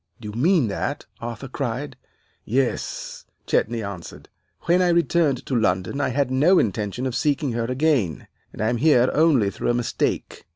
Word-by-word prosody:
"'Do 105 -3 -7
you - - -5
mean 150 - +3
that?' 100 - -3
Arthur 120 +1 -6
cried. 130 +2 -4 0.5
"'Yes,' 130 +2 -2 0.2
Chetney 115 0 0
answered. 100 -4 -8 0.3
'When 175 +2 +2
I 180 - +3
returned 170 -6 +2
to 130 - -2
London 105 +4 0
I - - +1
had 135 0 0
no 155 +9 +4
intention 105 - -1
of 130 -2 -2
seeking 145 0 0
her 115 0 -1
again, 125 - 0 0.3
and - - -5
I 110 - +2
am 120 - 0
here 130 -2 +4
only 145 -11 +3
through - - -3
a 120 - +2
mistake. 120 -1 -2
125 Hz, 170 wpm, -23 LUFS, 115-145 Hz, 0.5 s, no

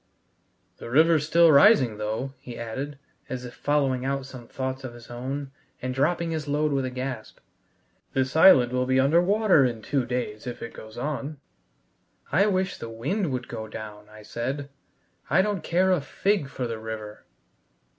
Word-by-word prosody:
"The - - -8
river's 155 +3 +4
still 165 0 +6
rising, 140 - +6
though," 110 +6 -3
he 120 -2 -9
added, 135 +5 -5 0.3
as 125 -1 -5
if 120 - -9
following 140 -3 0
out 135 0 -2
some 130 -3 -10
thoughts 130 +1 -4
of 125 -2 -7
his 120 0 -13
own, 135 +3 -5 0.3
and 130 0 -3
dropping 165 +5 0
his 155 -2 -3
load 150 +1 +1
with 135 -2 0
a - - -2
gasp. 125 -2 -5 0.8
"This 130 0 0
island 135 -8 +7
will 125 0 0
be 130 0 +3
under 145 +6 +4
water 200 -4 +4
in 120 -4 -1
two 130 -1 -1
days 125 -3 -3
if 120 - -6
it 115 - -7
goes 110 0 -11
on." 145 +2 -3 0.9
"I 195 +8 +4
wish 190 -2 0
the 115 - -6
wind 145 - -2
would 125 0 -3
go 110 -2 -6
down," 105 -1 -9
I 110 0 -13
said. 135 +6 -4 0.6
"I 175 +7 +4
don't 205 -3 -2
care 185 +2 +2
a 180 -5 +2
fig 195 +2 0
for 130 -2 -4
the 115 -2 -4
river." 110 -1 -7
130 Hz, 175 wpm, -26 LUFS, 120-155 Hz, 0.9 s, island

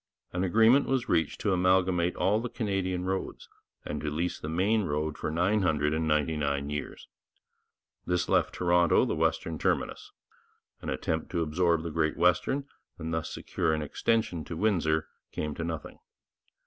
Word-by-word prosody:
An 90 +1 0
agreement 115 +8 +5
was 130 -2 0
reached 80 -8 +1
to 105 - +1
amalgamate 90 -1 +2
all 105 +3 +2
the 120 +2 -4
Canadian 95 -6 -2
roads 95 0 -3 0.4
and 75 - -4
to 75 - -2
lease 85 +4 -2
the 75 - -5
Maine 100 +7 +2
road 75 -1 -2
for - - -3
999 75 -5 +1
years. 75 0 -5 1.0
This 90 -1 0
left - - +2
Toronto 85 -1 +3
the - - -1
western 80 0 -1
terminus. - - -1 0.7
An - - -5
attempt 80 0 -2
to 85 -2 +1
absorb 85 +1 +1
the 85 - -4
Great 80 -1 0
Western 90 - +2 0.3
and 80 0 -4
thus 80 0 -2
secure 80 -3 -1
an 75 - -2
extension 90 +1 0
to 80 - -6
Windsor 80 -6 +1 0.2
came 75 -1 -3
to 85 - -5
nothing. 80 -2 -5
85 Hz, 150 wpm, -29 LUFS, 80-95 Hz, 1.0 s, agreement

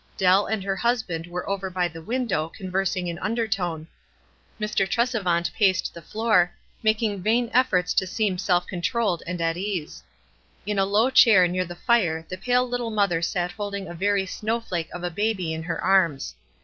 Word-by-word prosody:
Dell 190 +2 +4
and 220 -3 -2
her 195 0 -1
husband 220 -9 -1
were 175 +1 -5
over 195 -1 -2
by 180 -1 0
the 165 -1 -10
window 215 -6 -1
conversing 185 0 -2
in 170 0 -4
undertone. 190 -7 -2 0.7
Mr. 210 -2 0
Tresevant 200 -8 0
paced 190 -3 +2
the 170 - -10
floor, 210 -1 +2 0.3
making 215 -2 +1
vain 230 +4 +1
efforts 205 -8 +2
to 190 - +1
seem 195 -2 -1
self 180 -1 +1
controlled 190 +1 -1
and 180 0 -3
at 165 0 0
ease. 185 -5 -4 0.6
In 205 -1 -1
a 195 - +3
low 215 +6 +2
chair 205 -8 +7
near 185 +1 -1
the 175 0 -8
fire 175 -8 +1
the 185 - -4
pale 250 +4 +2
little 245 -1 -2
mother 200 -6 +1
sat 175 +1 -1
holding 200 -2 -5
a 170 - -7
very 195 +2 +1
snow 220 +4 -2
flake 175 -7 -4
of 180 - -7
a 175 - -2
baby 190 -3 -1
in 160 - -4
her 170 +2 -3
arms. 170 - +2
190 Hz, 180 wpm, -24 LUFS, 175-215 Hz, 0.7 s, chair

